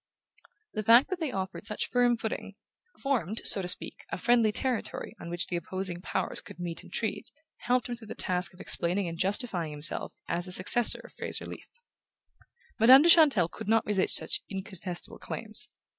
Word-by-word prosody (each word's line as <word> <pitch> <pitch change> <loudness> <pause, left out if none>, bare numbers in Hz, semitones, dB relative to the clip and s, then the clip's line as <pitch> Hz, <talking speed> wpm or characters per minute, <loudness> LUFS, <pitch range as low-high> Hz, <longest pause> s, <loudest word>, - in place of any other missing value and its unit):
The 215 - -2
fact 235 - +5
that 370 - -2
they 315 -5 -2
offered 190 0 -5
such 210 - -3
firm 245 -1 +2
footing 220 -3 -5 0.5
formed, 230 - -1
so 195 - +6
to 180 - -4
speak, 180 - 0
a - - -4
friendly 235 +1 +3
territory 245 -1 -2
on 170 - -7
which 175 0 +4
the 175 - -4
opposing 180 +1 -4
powers - - -2
could - - -13
meet 175 -1 -5
and - - -16
treat 210 -3 -3 0.3
helped 250 +1 0
him 245 - -4
through 235 -2 -9
the - - -7
task 180 -1 -1
of - - -20
explaining 180 +2 0
and 165 - -5
justifying 195 -4 0
himself 150 +1 -2
as 175 +1 -2
the - - -6
successor 205 +6 +2
of - - -13
Fraser - - -5
Leath. - - -10 1.1
Madame 255 +5 +8
de 340 - +5
Chantelle 290 - +6
could 190 - -8
not 225 0 +3
resist 200 -3 +1
such - - -1
incontestable 190 -3 -5
claims. - - -1
205 Hz, 185 wpm, -29 LUFS, 180-240 Hz, 1.1 s, Madame